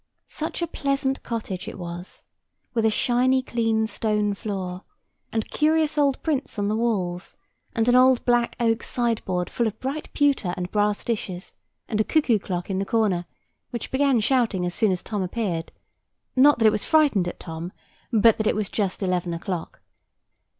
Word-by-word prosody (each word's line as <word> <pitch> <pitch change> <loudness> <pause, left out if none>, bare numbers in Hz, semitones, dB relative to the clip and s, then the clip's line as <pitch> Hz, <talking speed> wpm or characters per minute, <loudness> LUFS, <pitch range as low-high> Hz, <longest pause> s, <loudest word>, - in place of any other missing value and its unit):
Such 315 +2 -4
a - - 0
pleasant 275 -2 -1
cottage 205 -6 -4
it - - -6
was, 175 0 -7 0.5
with 225 -2 +1
a - - +5
shiny 255 +4 +2
clean 225 -3 +1
stone 210 -1 0
floor, 190 -3 -4 0.5
and 220 -1 -2
curious 310 0 +2
old 280 -3 +1
prints 285 -7 -1
on 205 0 0
the 210 - 0
walls, 190 -7 -1 0.4
and 225 0 +1
an 245 - +5
old 255 0 +5
black 240 -1 +2
oak 225 -1 +2
sideboard 215 -7 -1
full 235 - 0
of 220 0 -5
bright 275 +4 -4
pewter 275 - +1
and 180 0 -4
brass 210 0 +1
dishes, 190 -6 -4 0.3
and 215 -1 0
a - - +3
cuckoo 245 -5 +2
clock 180 -2 -4
in 190 -1 -2
the - - 0
corner, 200 -6 +1 0.4
which 235 - -5
began 270 -2 +3
shouting 225 -6 +1
as 175 - -2
soon 215 +1 +2
as 180 - -2
Tom 210 -2 -3
appeared: 185 -4 -2 0.6
not 285 +3 +6
that 225 - +2
it 215 - +7
was 210 - 0
frightened 290 - +3
at 175 - -6
Tom, 165 +1 -6 0.4
but 225 -1 +5
that 220 - +1
it - - +2
was 210 -1 -2
just 200 -2 -2
eleven 180 -2 -1
o'clock. 175 0 -5
220 Hz, 180 wpm, -24 LUFS, 185-250 Hz, 0.6 s, it